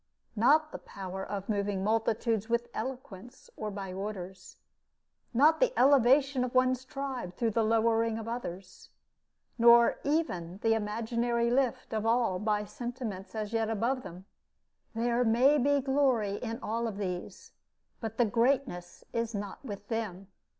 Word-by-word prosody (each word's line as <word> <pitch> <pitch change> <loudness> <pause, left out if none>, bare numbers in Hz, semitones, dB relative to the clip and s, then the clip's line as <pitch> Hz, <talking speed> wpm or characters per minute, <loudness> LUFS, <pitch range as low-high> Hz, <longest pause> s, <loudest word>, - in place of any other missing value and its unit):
Not 300 +8 +4
the - - -7
power 190 0 -7
of 200 -1 -5
moving 200 -2 -1
multitudes 225 0 0
with 235 0 0
eloquence 245 -1 -7
or 215 - -4
by 195 -2 -6
orders; 190 -2 -7 0.7
not 295 +6 +4
the - - +2
elevation 270 0 +4
of 250 0 -4
one 255 0 +4
tribe 260 -7 -5
through 230 -2 0
the 230 - +1
lowering 225 0 +2
of 225 0 -6
others, 190 -6 -7 0.7
nor 235 0 +6
even 190 - -1
the 225 -1 +4
imaginary 235 +2 -1
lift 255 -2 0
of 215 -1 -1
all 230 -5 +2
by 210 0 0
sentiments 235 -4 -6
as 215 0 -4
yet 225 -1 0
above 235 +4 0
them: 180 -4 -10 0.7
there 235 +1 +1
may 250 +6 +4
be 285 +2 +3
glory 260 -7 +1
in 230 -2 -4
all 230 +2 -1
of 210 -3 -5
these, 180 -3 -5 0.5
but 225 -1 -5
the 240 - +4
greatness 230 -6 0
is 230 -1 -2
not 200 +3 -6
with 205 -5 -8
them. 200 -5 -4
230 Hz, 145 wpm, -30 LUFS, 205-250 Hz, 0.7 s, nor